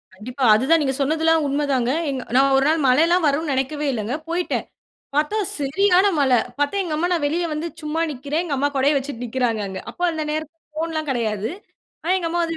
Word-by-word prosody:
கண்டிப்பா. 250 +7 -6
அதுதான், 275 +9 +3
நீங்க 270 -2 0
சொன்னதெல்லாம் 320 +2 +2
உண்ம 285 +2 0
தாங்க. 250 -2 +1 0.2
எங் 265 -2 -3
நான் 270 +1 +4
ஒரு 270 - +2
நாள் 315 0 +2
மழையில்லாம் 325 +7 +4
வருன்னு 295 +2 0
நெனைக்கவே 285 +3 -1
இல்லங்க. 225 +2 -2
போயிட்டேன். 345 +1 -1 0.5
பார்த்தா 300 +8 +1 0.2
செரியான 365 +7 +3
மழை. 265 -4 +4 0.2
பார்த்தா 290 +7 0
எங்க 325 -4 -3
அம்மா, 345 +3 0
நான் 335 -4 0
வெளிய 335 +4 0
வந்து 305 +3 -3
சும்மா 305 +2 -2
நிக்கிறேன், 285 +5 -2
எங்க 300 -5 -2
அம்மா 280 +2 +1
கொடைய 275 +3 +3
வச்சுட்டு 270 -3 -4
நிக்கிறாங்க 235 -2 -1
அங்க. 190 -1 -6
அப்ப - - -27
அந்த 315 -1 -3
நேரத்தில 310 +1 -4 0.2
ஃபோன்லாம் 315 -1 -2
கெடையாது. 220 -4 -1 0.5
ஆனா, 350 - +2
எங்க 340 -2 -2
அம்மா 345 +1 0
வந்து 330 0 -3
290 Hz, 195 wpm, -22 LUFS, 265-325 Hz, 0.5 s, நான்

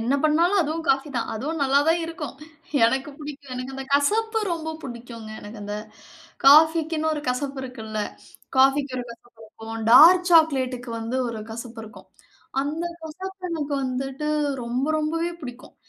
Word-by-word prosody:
என்ன 240 +5 +1
பண்ணாலும் 340 +6 +4
அதுவும் 320 +2 -3
காஃபி 270 +2 +1
தான். 230 - -1
அதுவும் 295 +7 -3
நல்லா 275 +1 +4
தான் 335 +1 +3
இருக்கும். 330 -4 -6 0.5
எனக்கு 265 +5 +1
பிடிக்கும். 290 -2 -9
எனக்கு 255 +1 -5
அந்த 270 0 -5
கசப்பு 445 +10 +2
ரொம்ப 320 -1 -3
பிடிக்குங்க. 235 -3 -8
எனக்கு 210 +1 -10
அந்த 205 +1 -4 0.7
காஃபிக்குன்னு 315 +1 +5
ஒரு 295 - -5
கசப்பு 270 +2 -2
இருக்குல்ல. 220 -4 -6 0.6
காஃபிக்கு 270 0 +3
ஒரு 245 - -4
கசப்பு 235 0 -15
இருக்கும். 225 0 -7
டார்க் 360 +5 +8
சாக்லேட்க்கு 260 -7 +3
வந்து 230 +3 -2
ஒரு 225 -2 -5
கசப்பு 230 0 -7
இருக்கும். 190 -3 -14 0.5
அந்தக் 335 +4 -4
கசப்பு 370 +4 -8
எனக்கு 295 -3 -2
வந்துட்டு 270 +3 -3 0.4
ரொம்ப 250 +4 -1
ரொம்பவே 330 +3 -1
பிடிக்கும். 245 -1 -9
275 Hz, 145 wpm, -24 LUFS, 240-320 Hz, 0.7 s, டார்க்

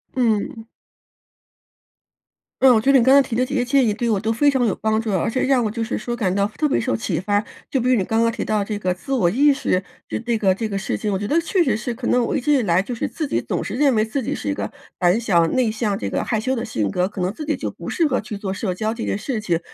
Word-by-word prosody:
嗯。 225 -2 0 2.0
嗯， 260 -2 +7
我 220 - +4
觉 270 +6 +3
着 270 - +8
你 - - +3
刚 260 +3 +5
才 280 - +8
提 225 - -3
的 255 - +2
这 270 - -6
些 250 -3 +1
建 265 0 +3
议 215 - +1
对 235 +2 -2
我 215 - +2
都 220 +3 -1
非 285 +6 +3
常 265 -3 +2
有 210 - +1
帮 220 0 0
助， 225 -2 -3
而 190 +1 0
且 255 +3 -1
让 260 -2 +3
我 - - 0
就 225 +2 -3
是 225 - -3
说 240 +3 -4
感 195 -6 0
到 200 +1 +1
特 300 - +1
别 - - +2
受 115 - 0
启 110 - -2
发。 205 +3 0 0.3
就 265 - 0
比 250 - +1
如 255 - +5
你 195 - +1
刚 225 +3 +1
刚 230 - +3
提 230 - -4
到 215 -1 0
这 205 0 -4
个 185 -3 0
自 185 +9 -10
我 210 -10 +3
意 280 +9 +4
识， 190 -8 0 0.2
就 - - -3
这 230 0 -1
个 190 -3 +2
这 220 +2 -3
个 200 - -2
事 190 - -2
情， 210 -2 -2
我 190 - -1
觉 205 - -3
得 325 +8 +2
确 355 +2 0
实 265 -9 +2
是， 235 +2 -3
可 240 +1 -5
能 245 -1 +3
我 290 - -1
一 - - 0
直 295 +4 +1
以 270 - +3
来 180 -4 +2
就 240 +5 -5
是 - - -2
自 310 - -4
己 - - 0
总 - - -3
是 - - -5
认 275 -1 +3
为 215 0 +2
自 245 +3 -3
己 - - -2
是 105 - -5
一 - - +1
个 100 0 -4 0.3
胆 180 +4 +3
小、 180 -8 +3
内 255 +1 +1
向、 215 -2 -1
这 - - -3
个 - - -1
害 220 - -1
羞 260 +4 -1
的 230 - -3
性 110 - -2
格， 180 - 0
可 205 - -9
能 180 +2 -1
自 305 +6 -7
己 305 - -1
就 - - -3
不 - - -8
适 335 -3 +1
合 255 -5 0
去 210 -1 -6
做 195 -2 -4
社 190 -1 -2
交 215 +4 -2
这 230 - -5
件 - - -1
事 225 +1 -3
情。 170 -5 0
225 Hz, 335 characters per minute, -21 LUFS, 200-255 Hz, 2.0 s, 着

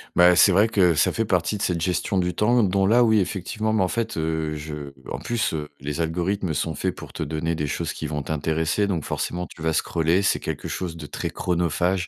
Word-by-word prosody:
Bah, 90 0 +7
c'est 95 - +6
vrai 100 +4 +5
que 95 -7 +3
ça - - +3
fait 115 - -1
partie 95 +1 0
de - - -7
cette 85 -4 0
gestion 90 +2 0
du 90 -1 +1
temps 120 +6 +3
dont 95 0 +2
là, 120 +5 +5
oui, 110 -2 +4
effectivement 105 +3 -2
mais 110 -3 +3
en - - +2
fait, 115 +2 -2
heu, 80 -1 -1
je 75 -1 -6 0.2
en - - -3
plus, 120 -6 -1
heu, 75 -2 -4
les 75 +3 -3
algorithmes 90 +2 -1
sont 75 +2 -2
faits, - - -2
pour - - -10
te - - -3
donner 80 +3 -2
des 75 -2 -2
choses - - -2
qui 80 - -5
vont 75 -1 -3
t'intéresser. 80 +6 0
Donc 85 -6 -1
forcément, 90 +1 -3
tu 80 - -14
vas 80 0 +1
scroller. 85 +4 +1
C'est 100 - +2
quelque - - -4
chose 85 -3 -4
de 80 - -8
très - - -4
chronophage. 90 +1 0
90 Hz, 235 wpm, -24 LUFS, 80-100 Hz, 0.2 s, Bah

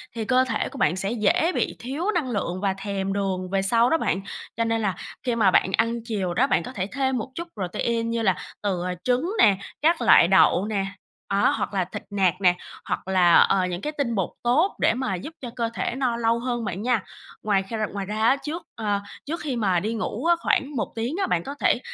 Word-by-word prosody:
thì 225 -1 -3
cơ 255 +2 +4
thể 235 - -2
của - - -10
bạn 215 -8 +2
sẽ 195 +3 -2
dễ 235 - +2
bị - - 0
thiếu 300 - -2
năng 325 -9 -1
lượng 185 -3 -2
và 195 -2 +1
thèm 195 0 -3
đường 190 -2 -2
về 195 0 +1
sau 230 +5 +3
đó 325 - +3
bạn. 195 - -1 0.4
Cho 230 - +2
nên 225 0 0
là 195 -5 0 0.3
khi 245 -2 0
mà 205 -5 +4
bạn 190 - +3
ăn 230 +1 +1
chiều 200 -6 -2
đó, 255 +8 +3
bạn - - +1
có 255 - -7
thể 190 -3 -2
thêm 265 -1 0
một 235 +3 -5
chút 340 +1 -5
protein, 230 +4 -2
như 230 0 -1
là, 190 -4 +3 0.3
từ, 195 -4 -1
ờ, 180 - -2
trứng 255 +7 +1
nè, 200 - +6 0.2
các 325 +3 +3
loại 170 - +7
đậu 190 0 +4
nè, 205 -3 -1 0.5
đó, 200 0 +3
hoặc - - -3
là 185 -2 +1
thịt 185 - -7
nạc 190 -2 +1
nè, 180 -2 +5 0.3
hoặc - - -3
là, 180 -3 +4
ờ, 190 -2 +4
những 180 0 -4
cái 300 - -3
tinh 235 -5 0
bột 195 -4 0
tốt 295 +12 +2
để - - +4
mà 250 -7 -1
giúp 305 - -7
cho 245 - -5
cơ 230 -1 -1
thể 240 - -2
no 250 -3 0
lâu 230 0 +1
hơn 240 -1 -2
bạn 190 0 -4
nha. 235 -3 +1 0.4
Ngoài 200 -2 +2
kh 195 +4 -11 0.2
ngoài 200 -1 -3
ra 215 +2 -3
á, 265 - +5
trước, 325 +4 -4
a, 205 -3 -1 0.2
trước 330 +4 -3
khi 285 -4 -2
mà 195 -6 +2
đi 215 +5 -2
ngủ 225 +3 -3
á, 345 0 +5
khoảng 285 -3 0
1 235 - -2
tiếng 235 +7 -2
á, 380 - +1
bạn 170 - 0
có 280 - -6
thể - - +3
220 Hz, 245 wpm, -24 LUFS, 195-255 Hz, 0.5 s, loại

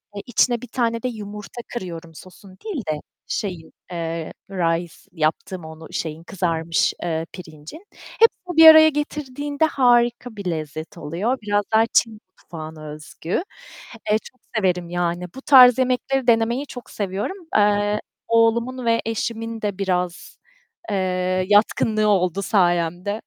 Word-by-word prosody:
Eee, 200 - -4
içine 240 0 +2
bir 250 - -8
tane 230 -2 -1
de - - 0
yumurta 210 0 -7
kırıyorum, 170 -6 -7
sosun 185 +2 -14
değil 350 - -3
de, 150 - -3 0.3
şeyin, 180 -7 -4 0.2
eee, 165 -1 -4 0.2
rice 170 -2 -1 0.2
yaptığım 160 +1 -2
onu, 160 0 -10
şeyin, 160 0 -4
kızarmış, 165 -3 0
eee, 165 -1 -2
pirincin. 160 - -11
Hepsini 360 -7 0
bir 325 0 +10
araya 315 0 +10
getirdiğinde 290 0 -2
harika 240 -4 +2
bir 200 -2 -8
lezzet 155 +1 -6
oluyor. 190 - -2
Biraz 205 -1 0
daha 220 +1 +5
Çin 225 - +3 0.3
mutfağına 155 -2 -9
özgü. 155 - -4 0.7
Eee, 215 - +5
çok 255 - -16 0.2
severim 180 -4 0
yani. 175 0 -1
Bu 265 - -8
tarz 255 -3 +8
yemekleri 255 +1 0
denemeyi 235 +4 +2
çok 245 -3 -10
seviyorum. 205 - -3 0.2
Eee, 205 0 +2 0.3
oğlumun 230 +2 +2
ve 230 0 +2
eşimin 225 0 -3
de 205 -3 -2
biraz, 180 -2 -2 0.5
eee, 185 -1 0
yatkınlığı 215 +1 +3
oldu 185 -1 +1
sayemde. 175 0 +1
205 Hz, 135 wpm, -22 LUFS, 175-240 Hz, 0.7 s, bir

